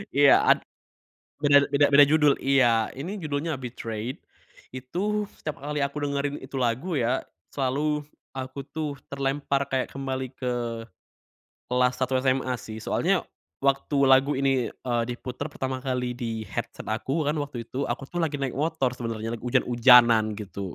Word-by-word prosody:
Iya 140 -1 +7
ad - - +4 0.8
bener 145 -1 +6
beda 145 0 +4
beda 145 0 +9
judul 150 -1 +4
iya 120 -5 +3
ini 180 +10 -5
judulnya 150 -2 -2
Betrayed, 115 -1 -5 0.5
itu 190 +12 -2
setiap 155 -2 -5
kali 150 0 -2
aku 140 +1 -2
dengerin 140 0 -2
itu 135 +1 -13
lagu 130 +8 -1
ya, 125 -1 +1 0.3
selalu 145 +2 -1 0.2
aku 130 +1 -6
tuh 145 +1 -4 0.2
terlempar 140 0 -1
kayak 130 -2 -1
kembali 130 -2 -4
ke 125 -2 -1 1.1
kelas 125 0 +3
1 130 0 +1
SMA 130 -1 +1
sih, 110 0 -8
soalnya - - +1 0.4
waktu 140 +1 +1
lagu 135 +2 +5
ini, 135 -2 +1
eee, 120 -2 -1
diputar 125 +1 -5
pertama 130 0 -3
kali, 125 -1 -2
di 115 -3 -3
headset - - -5
aku, 140 +7 -1
kan 155 - -2
waktu 140 -5 -4
itu 135 +2 -3
aku 135 +3 -4
tuh 175 - -4
lagi 150 -3 0
naik 130 - -2
motor 155 -4 +1
sebenernya, 115 -2 -4
lagi - - -20
ujan-ujanan, 120 -3 +5
gitu. 100 -3 -6
135 Hz, 150 wpm, -26 LUFS, 125-145 Hz, 1.1 s, beda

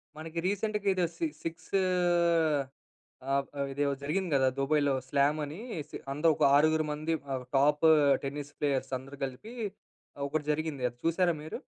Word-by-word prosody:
మనకి 160 +2 -5
రీసెంట్‌గా 205 +1 -1
ఏదో 180 -2 +1
సి 335 - 0 0.2
సిక్స్ 165 0 -6 1.6
ఆహ్, 140 0 +2 0.3
ఇది 140 +2 -4
ఇదో 140 - +1
జరిగింది 180 +5 -1
కదా! 130 -1 +4
దుబాయ్‌లో 145 0 +2 0.2
స్లామ్ 145 +2 +2
అనేసి. 155 - -6 0.2
అందరు 155 +3 +3
ఒక - - 0
ఆరుగురు 155 +2 +4
మంది 155 +2 -2 0.2
ఆహ్, 130 -1 -4
టాప్ 145 +3 +3 0.4
టెన్నిస్ 145 +1 -5
ప్లేయర్స్ 140 -3 0
అందరూ 135 +2 -11
కలిపి, 135 - -9 0.7
ఒకటి 150 +1 -2
జరిగింది 150 -3 -2
అది. 120 - -20
చూసారా 170 +1 +3
మీరు? 155 - -6
150 Hz, 145 wpm, -30 LUFS, 140-165 Hz, 1.6 s, కదా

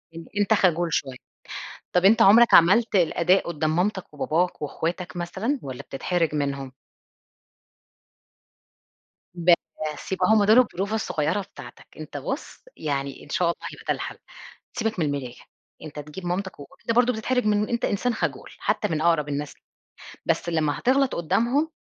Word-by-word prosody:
أن 165 -1 -8
أنت 205 +2 +3
خجول 175 -4 +2
شوية. 130 -2 -1 0.8
طَب 180 +1 +3
أنت 220 +3 +6
عُمرك 230 +4 +7
عملت 200 +7 +6
الأداء 175 +1 +3
قُدّام 155 -1 -1
مامتك 190 -2 -1
وباباك 165 +5 -1
وإخواتك 170 +5 -4
مثلًا 210 +11 -2
والّا 135 +1 -7
بتتحرج 165 +2 -1
منهم؟ 140 -2 -2 2.6
بس، 170 -2 0
يبقى 185 -1 +1
هم 220 -2 +5
دول 215 +4 +5
البروفة 205 -2 0
الصغيرة 165 -2 -1
بتاعتك. 195 - -12
أنت - - -7
بُص، - - -5 0.2
يعني 140 -2 -3
إن- - - -16
شاء 180 - +1
الله- 170 - 0 0.2
هيبقى - - -13
ده - - +3
الحَل. - - -6 0.6
سيبك 220 -4 -2
من 160 - +2
المرايا، 140 -4 -3 0.5
أنت 150 -1 -8
تجيب 150 +5 -8
مامتك 185 -1 -3
وب 140 - -10
أنت - - -2
برضه 250 0 +4
بتتحرج 250 +2 -1
من 210 0 +1
أنت 235 -1 0
إنسان 235 +4 0
خجول - - -3
حتّى 210 - 0
من 155 -3 -2
أقرب 160 -3 +2
الناس، 145 0 -3 0.7
بس 170 - 0
لمّا 155 -3 0
هتغلط 265 +1 +2
قُدّامهم، 235 - +1
175 Hz, 150 wpm, -24 LUFS, 155-210 Hz, 2.6 s, عُمرك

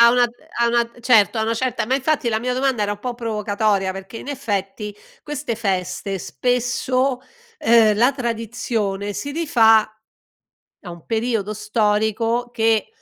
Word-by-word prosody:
A 235 0 +8
una 245 0 +4 0.4
a 235 - +4
una 235 0 +2
certo, 230 -2 +4
a 220 - +1
una 225 +1 0
certa 255 0 -1
ma 260 +4 +1
infatti 280 -2 0
la 220 - +1
mia 250 +2 -2
domanda 260 -4 +1
era 205 0 0
un 205 - -8
po' 245 0 -3
provocatoria, 210 -4 0
perché 195 +4 -8
in - - -9
effetti 210 -5 -3 0.3
queste 295 -6 -4
feste 195 -2 -2
spesso 250 +1 0 0.4
ehm, 225 -2 +5
la 245 +5 +4
tradizione 225 -4 -2
si 285 +7 -5
rifà 230 -9 +5 1.0
a 180 - -8
un 170 -2 -11
periodo 225 -2 -1
storico 220 +3 0
che 225 -2 +1
225 Hz, 150 wpm, -21 LUFS, 210-245 Hz, 1.0 s, A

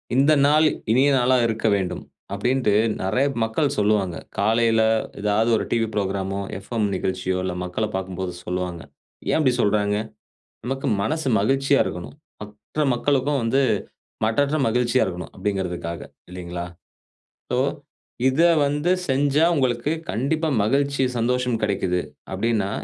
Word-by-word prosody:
இந்த 140 +3 +4
நாள் 155 +2 +5 0.3
இனிய 130 +5 +4
நாளாக 125 -1 +3
இருக்க 110 0 -1
வேண்டும். 90 -2 -3 0.3
அப்பிடின்டு 120 +2 +1 0.3
நெறைய 125 +9 +1 0.2
மக்கள் 110 +6 0
சொல்லுவாங்க. 100 -4 +1 0.2
காலையில 115 +2 +3 0.4
ஏதாவது 105 +2 +2
ஒரு - - -2
டிவி 115 -1 +1
புரோகிராம்மோ, 100 -1 -2 0.2
எஃப்எம் 105 +1 -2
நிகழ்ச்சியோ! 95 0 -2
இல்ல 95 - -2
மக்கள 90 +5 -2
பார்க்கும்போது 95 -1 -4
சொல்லுவாங்க. 90 -1 -3 0.5
ஏன் - - +3
இப்டி 130 -4 +3
சொல்றாங்க. 105 -1 +1 0.7
நமக்கு 135 +2 -3
மனது 150 +6 -1
மகிழ்ச்சியா 135 +6 +2
இருக்கணும். 90 +7 -6 0.3
மற்ற 105 +8 -5
மக்களுக்கும் 140 +2 +1
வந்து 130 +4 +2 0.6
மற்றற்ற 140 +7 +1
மகிழ்ச்சியா 120 +2 +2
இருக்கணும். 90 -1 -6
அப்பிடிங்கிறதுக்காக 90 -4 -3 0.3
இல்லேங்களா? 90 -1 -6 0.9
சோ, - - +1 0.7
இத 130 +4 +1 0.3
வந்து 145 +4 0 0.2
செஞ்சா 140 +3 +3
உங்களுக்கு 130 0 0 0.2
கண்டிப்பா 155 +7 0
மகிழ்ச்சி, 140 +5 +1 0.2
சந்தோஷம் 125 0 0
கிடைக்கிது. 95 -3 0 0.3
அப்பிடின்னா, 110 -4 0
110 Hz, 120 wpm, -23 LUFS, 95-135 Hz, 0.9 s, நாள்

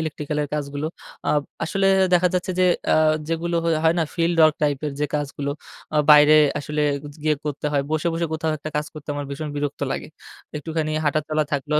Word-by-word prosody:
electrical 150 -1 -4
-এর 145 - -2
কাজগুলো। 145 0 -3 0.4
আ - - +3 0.3
আসলে 195 +4 0 0.3
দেখা 180 +1 +4
যাচ্ছে 180 +1 -1
যে 185 - +5 0.3
আ - - +5 0.3
যেগুলো 170 +1 -1 0.3
হয় 160 - +4
না - - +3
field 170 0 +1
work 155 -1 +6
type 145 -2 +1
-এর 145 - -2
যে 150 - +2
কাজগুলো 145 -1 -2 0.4
আ - - +2
বাইরে 150 +1 +8 0.2
আসলে 150 +1 -2 0.4
গিয়ে 155 0 +2
করতে 150 0 -3
হয়। 140 -1 +2
বসে, 155 +2 0
বসে 165 +1 -1
কোথাও 160 0 -1
একটা 155 +2 -6
কাজ 150 0 -1
করতে 150 -2 -11
আমার 145 0 -4
ভীষণ 150 +2 -4
বিরক্ত 145 -1 -3
লাগে। - - -5 0.5
একটুখানি 155 0 -3
হাঁটা 155 +1 +2
চলা 155 0 +1
থাকলো 145 +2 -1
150 Hz, 195 wpm, -23 LUFS, 145-160 Hz, 0.5 s, বাইরে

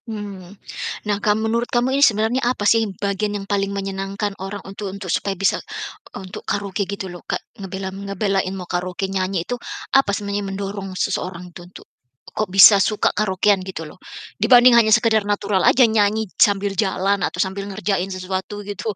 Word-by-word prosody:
Mmm. 200 -3 -7 0.5
Nah, 205 -1 0
kalau 215 +2 +1
menurut 235 +2 0
kamu 245 +2 +1
ini 280 - +1
sebenarnya 225 0 +3
apa 240 -4 -1
sih 225 +2 +5 0.2
bagian 205 +1 -1
yang 195 - -7
paling 200 -1 0
menyenangkan 195 +1 -3
orang 195 +1 -6
untuk 195 +1 -6
untuk 190 -3 -4
supaya 195 -1 -1
bisa 195 +1 +1 0.6
untuk 190 -1 -8
karaoke 200 -1 -3
gitu 200 -1 -4
loh 175 -2 -8
Kak, - - +1 0.2
ngebela 190 0 -5
m 200 +1 -7
ngebelain 195 -1 0
mau 180 - -6
karaoke 180 +2 -3
nyanyi 185 -2 -1
itu, - - -3 0.4
apa 270 -5 +4
sebenarnya 200 0 -2
yang 200 - -5
mendorong 195 -1 -5
seseorang 180 -2 -3
itu - - -10
untuk - - -13 0.5
kok 215 - -2
bisa 195 +2 +8
suka 215 +2 +1
karaokean 200 -1 +2
gitu 185 -3 -6
loh, - - -13 0.4
dibanding 250 -1 +7
hanya 230 -2 +5
sekedar 225 -2 +2
natural 205 -2 0
aja 255 - +6
nyanyi 220 0 +2
sambil 200 -1 +3
jalan 195 0 0
atau - - -8
sambil 195 +1 -5
ngerjain 195 -1 -2
sesuatu 190 +2 -5
gitu? 205 +2 -4
200 Hz, 175 wpm, -21 LUFS, 190-210 Hz, 0.6 s, bisa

